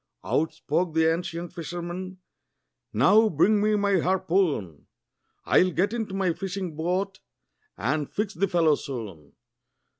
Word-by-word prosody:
Out 160 Hz, +2 st, +1 dB
spoke 160 Hz, +2 st, -2 dB
the 160 Hz, 0 st, +4 dB
ancient 170 Hz, 0 st, -5 dB
fisherman, 175 Hz, +2 st, -6 dB, 0.7 s
"Now 210 Hz, -, +5 dB
bring 205 Hz, +6 st, +3 dB
me 215 Hz, 0 st, +2 dB
my 200 Hz, -2 st, +2 dB
harpoon! 175 Hz, -, 0 dB, 0.6 s
I'll 185 Hz, -, +4 dB
get 190 Hz, +5 st, 0 dB
into 220 Hz, -5 st, -3 dB
my 190 Hz, -3 st, +1 dB
fishing 185 Hz, -2 st, -5 dB
boat, 185 Hz, +4 st, -2 dB, 0.6 s
and 145 Hz, +1 st, -1 dB
fix 210 Hz, -1 st, -2 dB
the 195 Hz, +5 st, 0 dB
fellow 165 Hz, -4 st, +3 dB
soon." 110 Hz, -, -6 dB
175 Hz, 125 wpm, -26 LUFS, 160-195 Hz, 0.7 s, Now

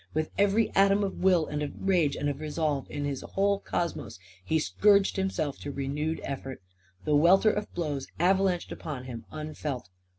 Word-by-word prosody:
With 155 Hz, 0 st, -1 dB
every 205 Hz, +2 st, +2 dB
atom 200 Hz, +1 st, +4 dB
of 195 Hz, -, -4 dB
will 180 Hz, -4 st, +4 dB
and 150 Hz, 0 st, -4 dB
of 145 Hz, -, -4 dB
rage 170 Hz, -7 st, +3 dB
and 145 Hz, -, -2 dB
of 145 Hz, -1 st, -2 dB
resolve 150 Hz, -2 st, -1 dB
in 145 Hz, 0 st, -3 dB
his 140 Hz, -2 st, -3 dB
whole 200 Hz, 0 st, 0 dB
cosmos, 170 Hz, -, -3 dB, 0.3 s
he 160 Hz, -, +1 dB
scourged 200 Hz, +5 st, +3 dB
himself 190 Hz, -7 st, -2 dB
to 145 Hz, -, -5 dB
renewed 145 Hz, +4 st, -2 dB
effort. 135 Hz, -1 st, -5 dB, 0.5 s
The 150 Hz, -, +2 dB
welter 185 Hz, +8 st, +5 dB
of 210 Hz, 0 st, -4 dB
blows 145 Hz, -6 st, -2 dB
avalanched 185 Hz, 0 st, +2 dB
upon 145 Hz, -6 st, -6 dB
him, 120 Hz, -3 st, -8 dB
unfelt. 150 Hz, -7 st, -5 dB
155 Hz, 170 wpm, -28 LUFS, 145-195 Hz, 0.5 s, welter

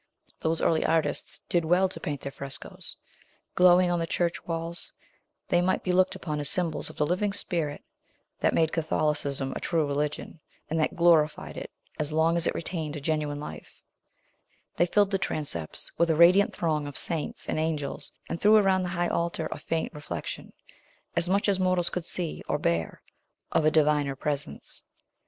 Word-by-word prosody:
Those 160 Hz, 0 st, 0 dB
early 160 Hz, -, +3 dB
artists 165 Hz, -1 st, -1 dB
did 175 Hz, -1 st, +1 dB
well 180 Hz, +4 st, +3 dB
to 185 Hz, -, -9 dB
paint 145 Hz, -5 st, -4 dB
their 140 Hz, -, -5 dB
frescos. 140 Hz, 0 st, -6 dB, 0.6 s
Glowing 180 Hz, 0 st, +5 dB
on 175 Hz, -, +1 dB
the 165 Hz, -, -1 dB
church 170 Hz, 0 st, -1 dB
walls, 165 Hz, 0 st, -3 dB, 0.6 s
they 175 Hz, -, +3 dB
might 185 Hz, +1 st, +1 dB
be 185 Hz, -, 0 dB
looked 185 Hz, +1 st, +3 dB
upon 150 Hz, -3 st, -4 dB
as 145 Hz, -1 st, +4 dB
symbols 170 Hz, -4 st, +1 dB
of -, -, -11 dB
the 150 Hz, -, +2 dB
living 185 Hz, +6 st, 0 dB
spirit 155 Hz, -7 st, -3 dB, 0.6 s
that -, -, +2 dB
made 160 Hz, -1 st, +3 dB
Catholicism 150 Hz, -4 st, -1 dB
a -, -, -3 dB
true 165 Hz, -3 st, 0 dB
religion, 145 Hz, +2 st, -3 dB, 0.3 s
and 165 Hz, -, +1 dB
that 155 Hz, -, 0 dB
glorified 160 Hz, -3 st, +3 dB
it -, -, -6 dB, 0.3 s
as 150 Hz, 0 st, -1 dB
long 160 Hz, +2 st, +3 dB
as 170 Hz, 0 st, +1 dB
it -, -, -1 dB
retained 160 Hz, -3 st, -3 dB
a -, -, -4 dB
genuine 150 Hz, -1 st, -1 dB
life; 150 Hz, -, -10 dB, 0.9 s
they 175 Hz, -, +3 dB
filled 205 Hz, +2 st, +3 dB
the 195 Hz, -, +1 dB
transepts 140 Hz, -, -1 dB
with 170 Hz, 0 st, +3 dB
a 160 Hz, -, +3 dB
radiant 180 Hz, +5 st, +6 dB
throng 155 Hz, -3 st, -1 dB
of 145 Hz, -, -6 dB
saints 165 Hz, -3 st, -1 dB
and -, -, -1 dB
angels, 155 Hz, -3 st, -3 dB, 0.2 s
and 165 Hz, -, -4 dB
threw 210 Hz, +1 st, +6 dB
around 190 Hz, -2 st, +3 dB
the 180 Hz, -, -2 dB
high 175 Hz, 0 st, +1 dB
altar 170 Hz, -1 st, -1 dB
a -, -, -5 dB
faint 165 Hz, -1 st, -2 dB
reflection 150 Hz, 0 st, -6 dB, 0.6 s
as 175 Hz, -, +1 dB
much 200 Hz, +3 st, +2 dB
as 195 Hz, -2 st, +2 dB
mortals 185 Hz, -2 st, +2 dB
could 180 Hz, -2 st, -4 dB
see, 170 Hz, -4 st, -1 dB
or -, -, +1 dB
bear 85 Hz, -, -1 dB, 0.5 s
of 155 Hz, -, +2 dB
a -, -, +6 dB
Diviner 150 Hz, -3 st, +2 dB
Presence. 145 Hz, +1 st, -4 dB
165 Hz, 180 wpm, -27 LUFS, 150-175 Hz, 0.9 s, radiant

